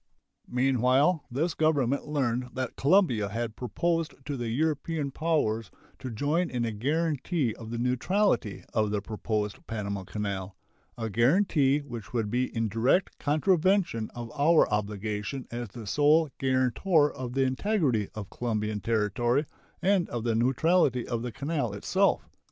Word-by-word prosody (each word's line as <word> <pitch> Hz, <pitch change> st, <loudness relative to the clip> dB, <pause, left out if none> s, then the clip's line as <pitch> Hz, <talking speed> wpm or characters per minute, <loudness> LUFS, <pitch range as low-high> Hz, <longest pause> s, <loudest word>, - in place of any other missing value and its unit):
Meanwhile 130 Hz, +5 st, +2 dB
this 155 Hz, +8 st, -1 dB
Government 140 Hz, -4 st, +1 dB
learned 125 Hz, -4 st, -1 dB
that 130 Hz, -2 st, -3 dB
Colombia 135 Hz, -, +3 dB
had 115 Hz, +1 st, -3 dB
proposed 165 Hz, +6 st, -1 dB
to 145 Hz, -, -3 dB
the 120 Hz, -2 st, -3 dB
European 150 Hz, +2 st, -1 dB
powers 130 Hz, -, 0 dB, 0.3 s
to 130 Hz, -, -5 dB
join 150 Hz, +9 st, 0 dB
in 120 Hz, -2 st, -1 dB
a 115 Hz, -, -1 dB
guaranty 145 Hz, -, -1 dB
of 115 Hz, -1 st, -9 dB
the 120 Hz, -, -4 dB
neutrality 125 Hz, -, +1 dB
of 110 Hz, -2 st, +1 dB
the 105 Hz, 0 st, 0 dB
proposed 105 Hz, 0 st, -3 dB
Panama 100 Hz, -3 st, -3 dB
canal 100 Hz, -1 st, -4 dB, 0.4 s
a 115 Hz, -1 st, -3 dB
guaranty 140 Hz, -, +3 dB
which 120 Hz, -7 st, -8 dB
would 110 Hz, -4 st, -1 dB
be 125 Hz, +2 st, +1 dB
in 115 Hz, -1 st, +1 dB
direct 115 Hz, -, +1 dB
contravention 170 Hz, -, +2 dB
of 120 Hz, -1 st, -6 dB
our 155 Hz, +3 st, +5 dB
obligation 105 Hz, +4 st, -3 dB
as 120 Hz, 0 st, -4 dB
the 115 Hz, +2 st, -9 dB
sole 150 Hz, +7 st, +3 dB
guarantor 135 Hz, -, +2 dB
of 125 Hz, -2 st, -6 dB
the 135 Hz, 0 st, +2 dB
integrity 130 Hz, -, +1 dB
of 105 Hz, -2 st, -7 dB
Colombian 110 Hz, -3 st, -2 dB
territory 115 Hz, +6 st, +1 dB, 0.4 s
and 190 Hz, -2 st, +2 dB
of 120 Hz, -2 st, -3 dB
the 115 Hz, -1 st, +1 dB
neutrality 130 Hz, +2 st, +2 dB
of 120 Hz, -2 st, -2 dB
the 120 Hz, 0 st, -4 dB
canal 140 Hz, -2 st, -2 dB
itself. 100 Hz, -, +1 dB
125 Hz, 145 wpm, -28 LUFS, 110-150 Hz, 0.4 s, our